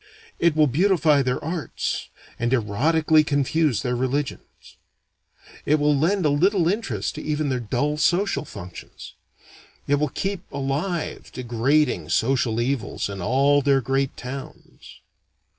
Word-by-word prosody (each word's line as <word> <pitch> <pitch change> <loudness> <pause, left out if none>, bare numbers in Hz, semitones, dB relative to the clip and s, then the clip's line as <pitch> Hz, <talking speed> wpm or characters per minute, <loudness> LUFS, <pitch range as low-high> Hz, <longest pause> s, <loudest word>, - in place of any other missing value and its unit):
It 170 -2 +3
will 155 -1 +5
beautify 155 0 +3
their 125 -1 -1
arts, 165 -1 -3 0.3
and 120 +1 0
erotically 155 +8 +3
confuse 145 -2 +1
their 125 -1 -1
religions. 135 +3 -4 0.9
It 150 - +3
will 150 -1 +2
lend 175 +6 +1
a - - +4
little 175 +4 +2
interest 145 - -2
to - - -7
even 150 -1 -1
their 130 -1 -1
dull 135 +6 -1
social 180 +5 +1
functions. 90 -10 -10 0.7
It 145 0 +1
will 150 -1 0
keep 195 +5 -3
alive 145 +6 -3
degrading 130 +5 0
social 120 -2 +1
evils 120 -4 -2
in 100 -2 -6
all 140 +7 +3
their 140 -1 +3
great 135 +2 -1
towns. 135 +2 -10
145 Hz, 130 wpm, -23 LUFS, 125-155 Hz, 0.9 s, will